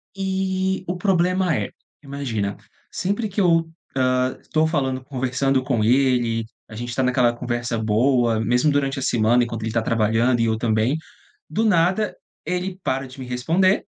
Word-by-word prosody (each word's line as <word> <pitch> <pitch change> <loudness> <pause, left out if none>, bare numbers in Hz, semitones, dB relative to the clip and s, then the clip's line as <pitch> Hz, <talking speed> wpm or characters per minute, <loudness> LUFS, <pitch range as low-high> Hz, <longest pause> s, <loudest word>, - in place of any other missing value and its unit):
E 190 -1 -1
o 180 - -1
problema 185 -1 +2
é, - - -2 0.3
imagina, 125 -8 -3 0.4
sempre 205 +4 -1
que 200 +1 -1
eu, 165 -3 +3 0.3
hã, 130 0 +1
tô 155 0 +3
falando, 135 -5 -1
conversando 130 0 0
com 125 -5 0
ele, 120 -2 +2 0.2
a 110 - -10
gente 120 +2 -5
tá - - +1
naquela 125 -1 +3
conversa 120 -1 -3
boa, 115 +1 +2
mesmo 125 +6 +2
durante 140 -1 0
a - - -5
semana 120 0 +3
enquanto 115 -2 -4
ele 110 - -2
tá 115 0 +1
trabalhando 115 +2 +2
e 115 - +3
eu 110 -1 +1
também, 110 +4 +1 0.5
do 210 +9 0
nada 190 +1 +2 0.3
ele 180 +1 -2
para 135 +1 -1
de 130 +1 -12
me 130 - -6
responder, 165 +11 +1
130 Hz, 165 wpm, -22 LUFS, 120-170 Hz, 0.5 s, eu